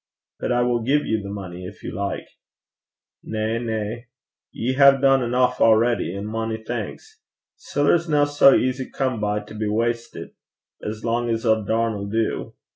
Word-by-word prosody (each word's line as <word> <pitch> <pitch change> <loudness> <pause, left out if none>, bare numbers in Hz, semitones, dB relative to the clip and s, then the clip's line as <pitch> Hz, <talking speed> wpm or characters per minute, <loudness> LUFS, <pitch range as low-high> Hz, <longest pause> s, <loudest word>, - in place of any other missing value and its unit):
'But - - -2
I 120 0 +2
will 120 -1 +1
give 140 +6 +1
you 110 -1 0
the 100 - -7
money 90 -3 -7
if 105 - -12
you - - -5
like.' 100 -1 -3 0.9
'Na, 110 +1 -2
na. 110 -1 -3 0.5
You 125 +3 -2
hae 140 +1 +8
dune 135 0 +4
eneuch 125 +1 +1
already, 110 -4 +3
an' 100 +1 -5
mony 110 +1 -3
thanks. 110 -2 -7 0.3
Siller's 160 +4 +1
no 145 -1 +4
sae 145 -1 +6
easy 130 +1 -1
come 130 -4 -2
by 105 0 0
to 105 +1 -12
be 110 0 -3
wastit, 115 +2 -2 0.5
as 105 +1 -5
lang's 115 0 -1
a 110 -1 +3
darn 115 +2 0
'll 100 -1 -5
do. 110 +1 -2
115 Hz, 165 wpm, -23 LUFS, 105-125 Hz, 0.9 s, hae